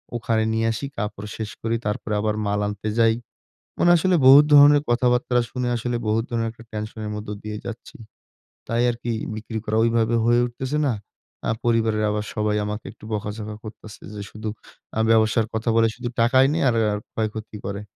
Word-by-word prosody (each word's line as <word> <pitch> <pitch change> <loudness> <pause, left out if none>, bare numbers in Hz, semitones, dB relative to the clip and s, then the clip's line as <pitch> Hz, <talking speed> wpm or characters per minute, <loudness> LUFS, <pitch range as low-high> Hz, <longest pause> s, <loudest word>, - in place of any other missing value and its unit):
ওখানে 110 -1 0
নিয়ে 115 0 +1
আসি, 115 +5 -4
কাপড় 105 0 -4
শেষ 110 -1 -4
করি 115 0 0
তারপরে 105 +1 -2
আবার 105 0 0
মাল 100 0 0
আনতে 105 +1 -4
যাই।" 115 -1 +5 0.6
মানে 175 - +4
আসলে 185 +2 +2
বহুত 140 +3 +9
ধরনের 145 0 +8
কথাবার্তা 125 +1 +2
শুনে 125 -1 -2
আসলে 120 +1 -2
বহুত 110 +1 +1
ধরনের 115 -1 0
একটা 115 0 -15
টেনশন 110 +1 -6
এর 105 - -4
মধ্য 105 0 -7
দিয়েই 105 0 -6
যাচ্ছি, 120 0 -8 0.7
তাই 115 +1 +1
আরকি 120 0 -4 0.2
বিক্রি 110 +1 -5
করা 110 0 -1
ঐভাবে 115 0 +2
হয়ে 120 +1 +4
উঠতেছে 130 +4 -3
না। 130 - +2 0.6
আ - - +3
পরিবারের 115 -2 +2
আবার 105 0 -2
সবাই 105 -1 0
আমাকে 105 +1 -4
একটু 110 - -17
বকাঝকা 105 +1 -4
করতেছে 110 -1 -11
যে 105 - -6
শুধু 110 0 -6 0.5
আ - - +2
ব্যবসার 110 0 +3
কথা 110 +2 -2
বলে 115 0 +5
শুধু 120 -1 -5
টাকাই 130 +3 +5
নি 160 - 0
আর, 120 - +2 0.2
আর 105 - -1 0.2
ক্ষয়ক্ষতি 110 0 -4
করে। 100 +1 -4
115 Hz, 185 wpm, -23 LUFS, 105-120 Hz, 0.7 s, বহুত